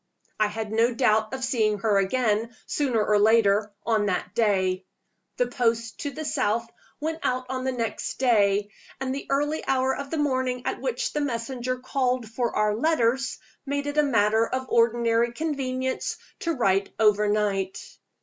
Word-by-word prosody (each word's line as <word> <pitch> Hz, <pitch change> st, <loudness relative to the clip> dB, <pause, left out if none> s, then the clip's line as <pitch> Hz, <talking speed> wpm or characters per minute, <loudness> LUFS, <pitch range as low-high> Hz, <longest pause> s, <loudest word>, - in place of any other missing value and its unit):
I 215 Hz, -, +4 dB
had 215 Hz, 0 st, -5 dB
no 230 Hz, +2 st, +2 dB
doubt 220 Hz, -3 st, +2 dB
of 260 Hz, 0 st, -4 dB
seeing 220 Hz, -5 st, +1 dB
her 205 Hz, -1 st, +2 dB
again, 225 Hz, +2 st, 0 dB
sooner 245 Hz, -7 st, 0 dB
or 210 Hz, -1 st, +3 dB
later, 210 Hz, -1 st, +4 dB
on 215 Hz, -3 st, +2 dB
that 180 Hz, -1 st, -2 dB
day. 190 Hz, -4 st, +1 dB, 0.5 s
The -, -, +3 dB
post 230 Hz, -, -1 dB
to 290 Hz, -, -2 dB
the 310 Hz, +2 st, -6 dB
south 230 Hz, -5 st, 0 dB, 0.3 s
went 320 Hz, +2 st, -3 dB
out 255 Hz, 0 st, -1 dB
on 260 Hz, 0 st, -3 dB
the 260 Hz, -, +1 dB
next 230 Hz, -3 st, -3 dB
day; 205 Hz, -5 st, +2 dB, 0.3 s
and 260 Hz, 0 st, -2 dB
the 275 Hz, -, -6 dB
early 295 Hz, +3 st, 0 dB
hour 265 Hz, 0 st, +2 dB
of 280 Hz, 0 st, -6 dB
the 320 Hz, -, -2 dB
morning 260 Hz, -4 st, 0 dB
at -, -, -2 dB
which -, -, -2 dB
the 300 Hz, -, 0 dB
messenger 255 Hz, -1 st, -2 dB
called 255 Hz, -2 st, -1 dB
for 230 Hz, +2 st, -2 dB
our 210 Hz, 0 st, +2 dB
letters 265 Hz, -1 st, +1 dB, 0.3 s
made 285 Hz, 0 st, -2 dB
it 290 Hz, +1 st, 0 dB
a -, -, +7 dB
matter 220 Hz, -5 st, +3 dB
of 260 Hz, 0 st, -3 dB
ordinary 235 Hz, 0 st, +2 dB
convenience 260 Hz, -3 st, -2 dB, 0.2 s
to 335 Hz, -, -1 dB
write 195 Hz, -4 st, +2 dB
overnight. 210 Hz, -2 st, +2 dB
235 Hz, 165 wpm, -25 LUFS, 215-265 Hz, 0.5 s, a